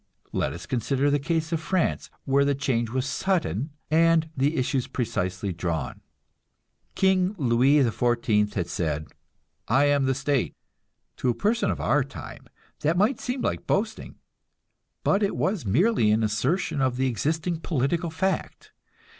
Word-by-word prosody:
Let -, -, -1 dB
us 85 Hz, +3 st, -8 dB
consider 135 Hz, +3 st, 0 dB
the 145 Hz, -, +2 dB
case 160 Hz, +2 st, -1 dB
of 165 Hz, -, 0 dB
France, 185 Hz, +1 st, -1 dB, 0.2 s
where 140 Hz, 0 st, +3 dB
the 140 Hz, 0 st, +1 dB
change 125 Hz, -4 st, 0 dB
was 130 Hz, +2 st, -1 dB
sudden, 145 Hz, -, -1 dB, 0.2 s
and 165 Hz, 0 st, +3 dB
the 140 Hz, +4 st, +1 dB
issues 130 Hz, 0 st, 0 dB
precisely 95 Hz, -5 st, -2 dB
drawn. 85 Hz, -4 st, -3 dB, 0.9 s
King 190 Hz, +1 st, +2 dB
Louis 130 Hz, 0 st, +3 dB
XIV 115 Hz, -3 st, +1 dB
had 90 Hz, -3 st, -1 dB
said, 80 Hz, -3 st, -2 dB, 0.6 s
"I 135 Hz, +5 st, +4 dB
am 145 Hz, -1 st, +3 dB
the 135 Hz, 0 st, +1 dB
state." 140 Hz, -1 st, 0 dB, 0.6 s
To 125 Hz, -, 0 dB
a 120 Hz, -, +1 dB
person 225 Hz, +3 st, +1 dB
of -, -, -2 dB
our -, -, +2 dB
time -, -, -10 dB, 0.3 s
that 160 Hz, +4 st, +1 dB
might 210 Hz, +8 st, +2 dB
seem 250 Hz, +1 st, -3 dB
like -, -, -2 dB
boasting, 220 Hz, +2 st, -1 dB, 0.9 s
but 200 Hz, -, +2 dB
it 200 Hz, -, 0 dB
was 185 Hz, -, -1 dB
merely 150 Hz, -, +3 dB
an 110 Hz, +1 st, +3 dB
assertion 130 Hz, -, 0 dB
of 130 Hz, -2 st, +1 dB
the 130 Hz, -, +1 dB
existing 160 Hz, +7 st, -1 dB
political 165 Hz, +2 st, -1 dB
fact. 190 Hz, +4 st, -3 dB
140 Hz, 150 wpm, -26 LUFS, 115-165 Hz, 0.9 s, I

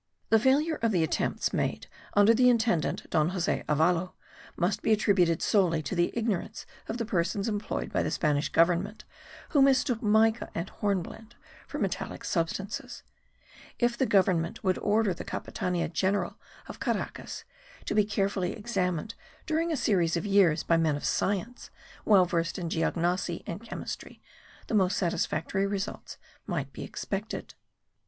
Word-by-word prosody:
The 225 Hz, -, +6 dB
failure 290 Hz, +7 st, +2 dB
of 230 Hz, -1 st, +2 dB
the 175 Hz, -5 st, +2 dB
attempts 160 Hz, -, -1 dB
made -, -, -1 dB, 0.3 s
under 205 Hz, +2 st, +6 dB
the 250 Hz, +2 st, +5 dB
intendant, 225 Hz, -, +1 dB
Don 155 Hz, 0 st, +3 dB
Jose 180 Hz, -2 st, -1 dB
Avalo, 165 Hz, +4 st, +2 dB, 0.4 s
must 180 Hz, +3 st, 0 dB
be -, -, +1 dB
attributed 190 Hz, -6 st, +3 dB
solely 170 Hz, -6 st, +2 dB
to 140 Hz, -, -4 dB
the 175 Hz, -1 st, +1 dB
ignorance 220 Hz, -2 st, -2 dB, 0.2 s
of 225 Hz, -, -3 dB
the 230 Hz, -, -2 dB
persons 195 Hz, +1 st, -1 dB
employed 215 Hz, -1 st, -3 dB
by -, -, +2 dB
the -, -, -1 dB
Spanish 150 Hz, -2 st, 0 dB
government 180 Hz, +5 st, +1 dB, 0.4 s
who 290 Hz, -, +3 dB
mistook 265 Hz, -3 st, +3 dB
mica 220 Hz, +1 st, +3 dB
and 170 Hz, +3 st, -3 dB
hornblende 210 Hz, +3 st, -3 dB, 0.3 s
for -, -, -5 dB
metallic -, -, -3 dB
substances. 185 Hz, +4 st, -3 dB, 0.7 s
If 240 Hz, -1 st, +1 dB
the 260 Hz, +1 st, +1 dB
government 185 Hz, +1 st, +2 dB
would 185 Hz, -2 st, +1 dB
order 210 Hz, -2 st, +2 dB
the 175 Hz, -, -7 dB
Capitania 180 Hz, -2 st, -2 dB
General 190 Hz, +3 st, 0 dB, 0.3 s
of -, -, -9 dB
Caracas -, -, -3 dB, 0.4 s
to -, -, -2 dB
be 210 Hz, -, +4 dB
carefully 200 Hz, -3 st, -1 dB
examined 205 Hz, -4 st, -2 dB, 0.3 s
during 325 Hz, +2 st, 0 dB
a 315 Hz, -, 0 dB
series 175 Hz, -8 st, +2 dB
of 170 Hz, -, -3 dB
years 195 Hz, -6 st, +4 dB
by 165 Hz, -, +3 dB
men 160 Hz, -3 st, +2 dB
of 145 Hz, -, -5 dB
science, 205 Hz, +5 st, -1 dB, 0.4 s
well 195 Hz, -4 st, +6 dB
versed 170 Hz, -1 st, -1 dB
in 175 Hz, -3 st, -3 dB
geognosy 170 Hz, +1 st, -1 dB
and 170 Hz, -, -5 dB
chemistry, 235 Hz, -, -7 dB, 0.5 s
the -, -, -6 dB
most 195 Hz, -2 st, +3 dB
satisfactory 175 Hz, +1 st, 0 dB
results 200 Hz, 0 st, -4 dB, 0.3 s
might -, -, -3 dB
be -, -, -7 dB
expected. -, -, -5 dB
195 Hz, 150 wpm, -28 LUFS, 170-220 Hz, 0.7 s, The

